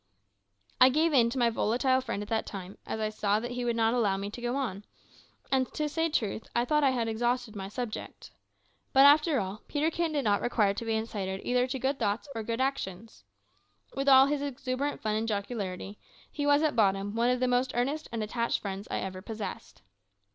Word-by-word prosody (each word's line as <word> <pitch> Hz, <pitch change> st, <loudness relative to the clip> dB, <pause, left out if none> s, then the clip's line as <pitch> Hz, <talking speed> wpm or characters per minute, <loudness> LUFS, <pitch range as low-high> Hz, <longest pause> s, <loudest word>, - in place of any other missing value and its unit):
I 255 Hz, -, +8 dB
gave 310 Hz, +4 st, +2 dB
in 235 Hz, -4 st, +5 dB
to 255 Hz, -, -5 dB
my 240 Hz, -2 st, +3 dB
volatile 255 Hz, +4 st, +1 dB
friend 220 Hz, -5 st, -4 dB
at 205 Hz, -, -11 dB
that 225 Hz, -1 st, -1 dB
time, 195 Hz, -1 st, -8 dB
as -, -, -3 dB
I 215 Hz, 0 st, 0 dB
saw 210 Hz, -1 st, 0 dB
that 240 Hz, +2 st, -5 dB
he 245 Hz, 0 st, -3 dB
would 235 Hz, -1 st, 0 dB
not 225 Hz, 0 st, +2 dB
allow 210 Hz, -6 st, +2 dB
me 200 Hz, +1 st, -4 dB
to 240 Hz, -, -8 dB
go 240 Hz, +1 st, -1 dB
on, 215 Hz, -8 st, -3 dB, 0.7 s
and, 260 Hz, -1 st, +1 dB
to 300 Hz, -, 0 dB
say 325 Hz, +2 st, 0 dB
truth, 220 Hz, -7 st, -2 dB
I 240 Hz, -, +2 dB
thought 300 Hz, +4 st, +2 dB
that 280 Hz, -, +4 dB
I -, -, +5 dB
had 240 Hz, -3 st, 0 dB
exhausted 240 Hz, 0 st, -1 dB
my 195 Hz, -1 st, -5 dB
subject. 225 Hz, +1 st, -6 dB, 0.6 s
But, 270 Hz, +1 st, +7 dB
after 300 Hz, 0 st, +5 dB
all, 195 Hz, +1 st, -4 dB
Peterkin 320 Hz, +2 st, 0 dB
did 285 Hz, -2 st, 0 dB
not 205 Hz, -2 st, +2 dB
require 215 Hz, -4 st, +2 dB
to 220 Hz, +3 st, -5 dB
be 225 Hz, -1 st, 0 dB
incited 200 Hz, -4 st, -3 dB
either 250 Hz, 0 st, +1 dB
to 260 Hz, -, -3 dB
good 270 Hz, +2 st, -1 dB
thoughts 210 Hz, +3 st, -1 dB
or 225 Hz, -, -3 dB
good 230 Hz, +2 st, -3 dB
actions. 220 Hz, -, -3 dB, 0.7 s
With 275 Hz, +1 st, 0 dB
all 265 Hz, 0 st, +8 dB
his 285 Hz, 0 st, -1 dB
exuberant 280 Hz, 0 st, -3 dB
fun 215 Hz, -1 st, 0 dB
and 220 Hz, +1 st, -1 dB
jocularity, 200 Hz, -2 st, -4 dB, 0.3 s
he 290 Hz, -1 st, -2 dB
was 290 Hz, +1 st, +4 dB
at 305 Hz, -4 st, +1 dB
bottom 200 Hz, -2 st, +2 dB
one 235 Hz, +2 st, +2 dB
of 250 Hz, 0 st, +1 dB
the 255 Hz, -, +1 dB
most 250 Hz, +1 st, +1 dB
earnest 280 Hz, +6 st, -1 dB
and 225 Hz, -2 st, -2 dB
attached 235 Hz, +2 st, -1 dB
friends 195 Hz, 0 st, -5 dB
I -, -, -2 dB
ever 185 Hz, -1 st, -5 dB
possessed. 215 Hz, -, -7 dB
235 Hz, 215 wpm, -29 LUFS, 210-265 Hz, 0.7 s, I